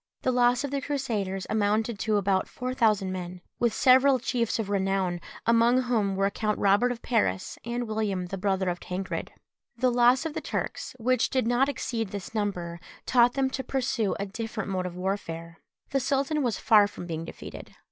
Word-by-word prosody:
The 255 - +2
loss 245 +1 +3
of 285 - -3
the 280 -1 -1
Crusaders 215 -10 -2
amounted 215 +1 0
to 215 +1 +1
about 195 -1 +1
four 255 0 -4
thousand 215 -6 +2
men, 180 -1 -5 0.2
with 235 -1 +2
several 260 +4 +5
chiefs 235 -1 -1
of 220 -3 -2
renown, 190 -3 0 0.2
among 235 +2 +4
whom 215 -6 0
were 195 +1 +2
Count 210 0 -1
Robert 205 +5 +3
of 240 -1 -6
Paris 210 - 0
and 240 +1 -3
William 210 -4 -1
the 195 +2 -5
brother 190 -1 0
of 175 0 -3
Tancred. 190 +1 -4 0.5
The 255 +1 +2
loss 245 +4 +4
of 320 - -3
the - - -4
Turks, - - -4
which 250 0 +1
did 260 -3 +1
not 245 +4 +3
exceed 230 -5 -2
this 200 +1 -7
number, 180 -6 -2 0.3
taught 245 -1 +4
them 265 -1 0
to 265 - -3
pursue 255 -6 -1
a 200 - -1
different 220 0 -5
mode 185 -1 -1
of 175 - -8
warfare. 170 -3 -4 0.3
The 275 - +2
sultan 275 +3 0
was 240 -6 0
far 210 -2 +5
from 205 -3 -9
being 165 -2 -4
defeated. 165 - -10
220 Hz, 190 wpm, -27 LUFS, 195-250 Hz, 0.5 s, several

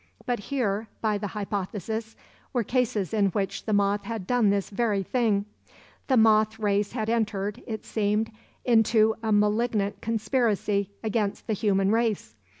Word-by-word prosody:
But 245 -2 -1
here, 220 -2 -1
by 215 -2 0
the 205 - -3
hypothesis, 210 +2 -4 0.4
were 245 -3 +1
cases 225 -5 0
in 205 -2 +3
which 195 -2 -2
the 220 - -2
moth 205 0 +2
had 220 -3 -4
done 240 -1 +3
this 200 0 0
very 205 -2 0
thing; 210 -2 +1 0.6
the 260 - +3
moth 220 -1 +4
race 205 -1 0
had 220 -3 -2
entered, 210 -3 -1
it 220 -2 -5
seemed, 215 +1 0 0.3
into 225 -2 +4
a 220 -1 -1
malignant 210 -1 +1
conspiracy 215 -3 0
against 215 -2 -1
the 220 - -1
human 195 -1 +2
race. 220 - 0
215 Hz, 150 wpm, -26 LUFS, 200-225 Hz, 0.6 s, moth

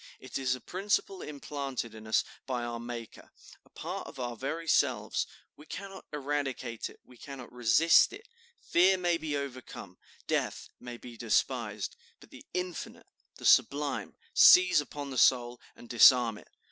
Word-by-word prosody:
It 130 - -6
is 130 -1 0
a - - -10
principle 195 +2 -2
implanted 140 -4 -5
in 110 0 -11
us 110 - +2 0.2
by 125 -2 -2
our 120 0 -4
Maker, 120 -1 -8 0.3
a - - -25
part - - -6
of - - -11
our 120 -1 -3
very 160 +8 -4
selves; 120 -9 +1 0.3
we 150 - -16
cannot 195 0 -8
eradicate 140 -5 -3
it, - - -17
we 125 - -18
cannot 135 -1 -10
resist 125 +7 +5
it; 415 +4 -11 0.3
fear 185 +2 +3
may 175 -2 +1
be 155 -3 -3
overcome, 130 -9 -8 0.3
death - - -2
may 120 -1 -8
be 120 -1 -11
despised; 115 -2 -1 0.2
but - - -18
the - - -12
infinite, 180 -2 -5 0.3
the - - -10
sublime 145 0 +2 0.2
seize 180 -4 +7
upon 145 -1 -7
the 130 - -1
soul 120 -1 +3
and 120 - -14
disarm 120 -2 +6
it. - - -18
130 Hz, 160 wpm, -30 LUFS, 120-150 Hz, 0.3 s, seize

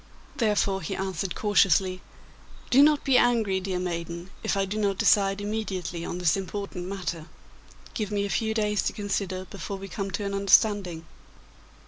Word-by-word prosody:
Therefore 205 -4 +1
he 160 - -4
answered 190 -2 -3
cautiously, 195 -3 +3 0.7
'Do 260 +3 +7
not 300 0 +5
be 265 -2 +4
angry, 225 -6 +2
dear 190 -1 -3
maiden, 170 0 -4
if - - -1
I 195 - +2
do 205 +3 -3
not 200 -2 0
decide 195 0 +3
immediately 195 -5 -3
on 175 - -4
this 175 -3 +2
important 195 -2 -5
matter. 175 -4 -4 0.7
Give 210 -3 -2
me 205 -1 -1
a - - -4
few 220 -1 0
days 210 -3 +1
to - - -1
consider 195 -2 -3
before 195 +1 -6
we 195 0 -8
come 195 +1 -4
to 200 +2 -3
an 200 - -3
understanding. 195 -4 +3
195 Hz, 165 wpm, -26 LUFS, 185-210 Hz, 0.7 s, Do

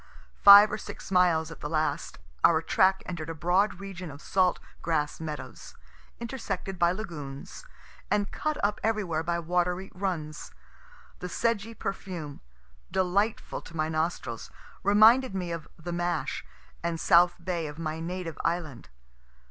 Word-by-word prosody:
Five 200 +1 +10
or 210 - -3
six - - -9
miles 170 -4 +3
at 165 - -10
the 150 - -5
last, 155 -1 -1 0.3
our 165 -2 +6
track 190 +4 +2
enter'd 165 -3 -5
a 165 - -4
broad 180 +4 +1
region 190 -3 -7
of 140 0 -10
salt 185 +3 +2 0.2
grass 150 -3 -1
meadows, 155 -3 -7 0.4
intersected 200 -6 -4
by 170 0 +4
lagoons, 165 - -7 0.4
and 205 -1 0
cut 305 -1 -2
up 205 0 0
everywhere 205 -8 0
by 170 +1 -1
watery 180 +2 -1
runs. 170 -5 -4 0.7
The 180 - -5
sedgy 230 +2 -1
perfume, 175 -8 -5 0.5
delightful 195 +4 0
to 165 - -11
my 155 0 0
nostrils, 160 +2 -2 0.3
reminded 215 +3 +5
me 180 -2 -3
of 165 -2 -5
"the 170 +1 -6
mash" 175 -1 -2 0.4
and 170 -1 -2
south 175 +1 +5
bay 170 -4 -1
of 145 0 -8
my 160 -1 -3
native 170 -1 -5
island. 165 - -2
175 Hz, 140 wpm, -28 LUFS, 160-195 Hz, 0.7 s, Five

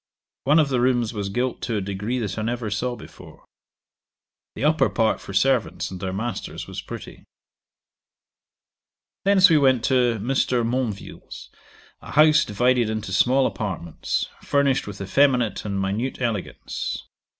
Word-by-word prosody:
One 150 +4 +5
of 155 -3 +4
the 125 -3 +1
rooms 120 -2 +1
was 100 -2 -3
gilt 125 +5 -2
to 115 -3 -2
a - - +1
degree 100 +5 -3
that 110 -3 -3
I - - -2
never 115 -1 -2
saw 120 +4 -1
before. 110 - -14 1.1
The - - -5
upper 155 +2 +3
part 110 -2 +1
for - - -9
servants 120 +2 +1
and 95 - -7
their 95 +1 -3
masters 115 +5 -4
was - - -6
pretty. - - -9 2.0
'Thence 195 -2 +6
we 155 - +6
went 130 -4 +3
to 125 -3 +2
Mr. 125 +1 +1
Monville's, 120 -4 -4 0.5
a - - -10
house 155 +1 +6
divided 120 +2 +1
into 110 -3 -4
small 130 +7 +3
apartments, 90 -6 -3
furnished 140 -4 +1
with 100 -1 -7
effeminate 120 0 +2
and 100 -1 -2
minute 105 +7 -2
elegance. 115 -6 -3
120 Hz, 145 wpm, -23 LUFS, 105-130 Hz, 2.0 s, Thence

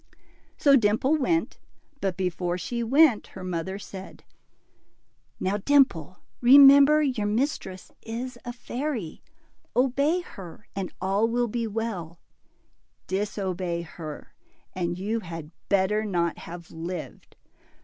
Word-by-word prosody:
So 280 -2 +5
Dimple 240 +5 +3
went, 330 +4 0 0.4
but 190 -6 -2
before 180 -1 -1
she 235 +7 -3
went, 260 0 +4
her 185 - -7
mother 185 +1 -3
said, 195 -1 -10 1.2
Now, 195 +2 0
Dimple, 205 - +2 0.2
remember, 280 +3 +8
your 250 -7 0
mistress 210 -5 -2
is 240 +3 -5
a 245 - -5
fairy; 240 - -5 0.5
obey 280 +7 +2
her, 195 - -11
and 195 -2 -3
all 195 +4 +1
will 240 +1 0
be 230 +1 -2
well; 200 -7 -4 0.9
disobey 185 -3 -2
her, 155 -2 -9 0.4
and 175 -2 -2
you 210 +5 -2
had 165 -5 -8 0.2
better 200 +2 +2
not 175 -5 -1
have 170 0 -10
lived. 165 +1 -7
205 Hz, 115 wpm, -26 LUFS, 180-250 Hz, 1.2 s, remember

